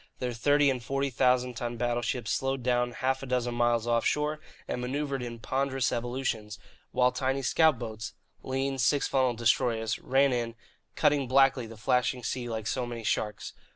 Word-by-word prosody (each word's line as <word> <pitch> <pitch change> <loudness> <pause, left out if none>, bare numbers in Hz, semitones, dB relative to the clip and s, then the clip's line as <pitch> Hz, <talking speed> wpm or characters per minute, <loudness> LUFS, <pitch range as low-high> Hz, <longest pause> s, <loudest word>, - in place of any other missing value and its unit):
Their 125 -1 -3
thirty 145 +4 +3
and 125 -2 -4
forty 135 +2 -1
thousand 125 0 +2
ton 120 0 -4
battleships 120 0 -1
slowed 135 -1 -1
down 120 0 +1
half 130 +2 -1
a 135 - -6
dozen 125 -1 0
miles 120 -1 +2
offshore 150 +6 +1 0.3
and 125 - -3
manoeuvred 135 +1 -2
in 120 -1 -5
ponderous 135 +2 -1
evolutions, 120 -3 -3 0.3
while 125 0 +3
tiny 130 +2 -1
scout 155 +2 +4
boats 110 -1 -6 0.3
(lean, 135 +1 -2
six 130 +5 +2
funnelled 130 -3 +1
destroyers) 115 -1 +1
ran 135 0 +3
in, 115 -1 -2 0.4
cutting 145 -4 +2
blackly 135 -3 +4
the 115 - -10
flashing 125 +2 +1
sea 120 0 -3
like 110 -2 -4
so 125 +2 -1
many 120 -1 -6
sharks. 105 0 -2
125 Hz, 165 wpm, -29 LUFS, 120-135 Hz, 0.4 s, scout